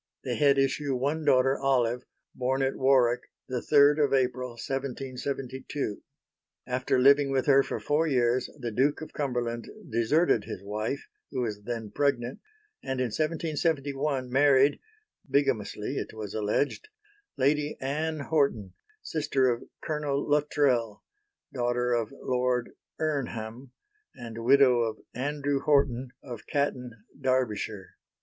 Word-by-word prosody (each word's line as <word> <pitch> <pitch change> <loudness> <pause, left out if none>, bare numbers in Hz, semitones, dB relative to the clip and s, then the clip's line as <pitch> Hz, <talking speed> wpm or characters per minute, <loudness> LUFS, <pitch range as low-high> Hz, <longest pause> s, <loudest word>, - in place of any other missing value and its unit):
They - - -2
had 140 -2 +4
issue 135 0 +1
one 145 +5 -1
daughter, 135 -1 +4
Olive, 125 -3 +1 0.3
born 130 +1 0
at 135 - 0
Warwick 130 -2 +3 0.2
3 145 +4 +4
April 125 -1 -1
1772. 135 -1 -4 0.6
After 130 +1 0
living 140 +2 +5
with 135 -1 +1
her 140 -1 +6
for - - -4
four 155 +3 +1
years 125 -3 +1
the 120 -4 -4
Duke 135 +8 +1
of 160 - -8
Cumberland 120 -4 -2 0.2
deserted 115 - +2
his 95 - -7
wife, 110 +6 -3 0.2
who 130 - -2
was 105 -4 -3
then 115 -3 -4
pregnant, 135 -4 0 0.4
and 130 -1 -3
in 125 -3 0
1771 150 -4 -1
married 140 +1 +4 0.5
bigamously, 135 -3 0
it - - -4
was 105 -2 -6
alleged 110 - -1 0.5
Lady 145 +2 +1
Anne 155 +3 -2
Horton, 140 - 0 0.3
sister 135 -5 +1
of 120 - -3 0.2
Colonel 150 -2 -1
Luttrell, 140 -7 +1 0.5
daughter 125 -1 0
of 115 -2 0
Lord 125 -2 -1 0.3
Irnham, 125 -5 -3 0.5
and 115 -1 -7
widow 130 -1 +5
of 110 -2 -1 0.2
Andrew 145 +2 -1
Horton 135 -3 +2
of 120 -4 -9
Catton, 125 -6 -2 0.2
Derbyshire. 110 -6 -1
130 Hz, 120 wpm, -28 LUFS, 120-140 Hz, 0.6 s, her